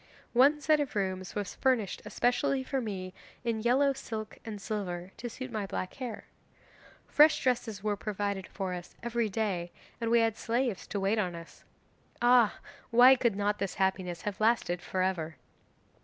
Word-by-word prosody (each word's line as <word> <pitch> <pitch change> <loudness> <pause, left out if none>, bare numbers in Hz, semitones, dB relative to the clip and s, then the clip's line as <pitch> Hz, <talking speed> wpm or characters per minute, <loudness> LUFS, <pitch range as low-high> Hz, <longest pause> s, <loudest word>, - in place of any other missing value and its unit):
One 275 +5 +5
set 305 0 +3
of 285 -5 -2
rooms 185 -2 -2
was 205 -2 -3
furnished 245 -8 0
especially 250 +2 +1
for 265 0 -2
me 185 -5 -5 0.3
in 230 -2 -1
yellow 270 +4 +3
silk 215 -4 -6
and 215 -3 -6
silver, 190 -4 -4
to 240 - -5
suit 255 +2 -7
my 215 -3 -3
black 185 -1 -4
hair. 250 -5 -6 0.8
Fresh 305 +1 +5
dresses 230 -5 0
were 210 -1 +1
provided 200 -2 -3
for 190 -2 -4
us 175 -1 -8
every 235 -2 0
day, 190 -5 -2 0.3
and 230 - 0
we 235 0 +5
had 225 -1 +1
slaves 235 -3 -1
to 200 - -3
wait 195 +3 +1
on 180 -4 -1
us. 165 0 -12 0.5
Ah, 240 -3 +5 0.3
why 245 +3 +8
could 235 -5 +1
not 205 +1 0
this 195 -1 -2
happiness 190 -2 -1
have 205 0 -4
lasted 215 -6 +2
for 185 0 -1
ever! 165 -4 -1
215 Hz, 170 wpm, -30 LUFS, 190-240 Hz, 0.8 s, why